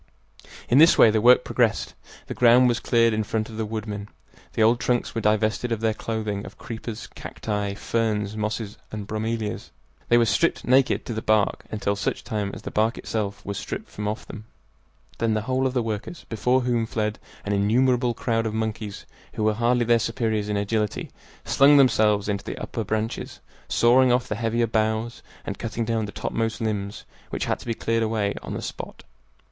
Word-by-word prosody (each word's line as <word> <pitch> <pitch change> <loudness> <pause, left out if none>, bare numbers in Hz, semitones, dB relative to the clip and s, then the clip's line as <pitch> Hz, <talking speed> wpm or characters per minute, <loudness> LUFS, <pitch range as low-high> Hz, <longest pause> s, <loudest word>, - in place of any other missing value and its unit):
In 125 - +5
this 165 +2 +7
way 110 - +7
the 110 0 +1
work 125 +2 +6
progressed. 115 -3 0 0.3
The - - -5
ground 125 +1 +6
was 120 0 +1
cleared 115 -2 +3
in 110 0 0
front 110 +1 -2
of 110 - -9
the 110 -1 -2
woodmen. 105 -2 -5 0.4
The 110 - +2
old 115 +2 +4
trunks 125 -1 0
were 115 - -2
divested 110 +3 +1
of 115 - 0
their 110 -1 +1
clothing 110 -2 -3
of - - -11
creepers, 115 -1 -6
cacti, 105 -2 -4
ferns, 105 -2 -1
mosses, 105 0 -3
and 105 -2 -5
bromelias. 110 0 -3 0.4
They 120 - +6
were 120 - +4
stripped 165 +8 +1
naked 130 +1 +3
to 120 - -4
the 110 - -3
bark, 110 -2 +1
until 100 -1 -1
such 100 - -2
time 105 -2 -2
as - - -10
the - - -5
bark 110 +2 +1
itself 100 -3 -4
was 100 -1 -3
stripped - - -6
from 105 0 -4
off 105 +1 -3
them. 110 -1 -9 0.7
Then 115 -1 +1
the 110 - 0
whole 130 +4 0
of 130 - -4
the 125 - +2
workers, 110 +9 -5
before 125 +3 +2
whom 120 -2 0
fled 110 -2 -2 0.3
an 100 - -1
innumerable 120 +4 +2
crowd 115 -2 0
of 110 - -4
monkeys 110 -2 -4 0.3
who 110 - -1
were 110 0 +3
hardly 120 +2 +2
their 120 0 +4
superiors 110 -2 -1
in 105 - 0
agility, 105 +1 -1 0.3
slung 145 +1 +6
themselves 110 -6 +4
into 100 -1 -2
the - - -6
upper 115 - -4
branches, 110 +2 -3 0.3
sawing 125 +2 +4
off 125 0 +1
the - - -2
heavier 115 +2 0
boughs 110 +1 -1 0.2
and 100 -2 -5
cutting 115 0 -3
down 115 -1 0
the 105 - -7
topmost 115 0 -2
limbs, 105 -2 -3 0.2
which - - -2
had - - -1
to - - -12
be 115 - -1
cleared 115 +1 0
away 110 -2 0
on - - -6
the - - -5
spot. - - -7
110 Hz, 195 wpm, -24 LUFS, 105-120 Hz, 0.7 s, this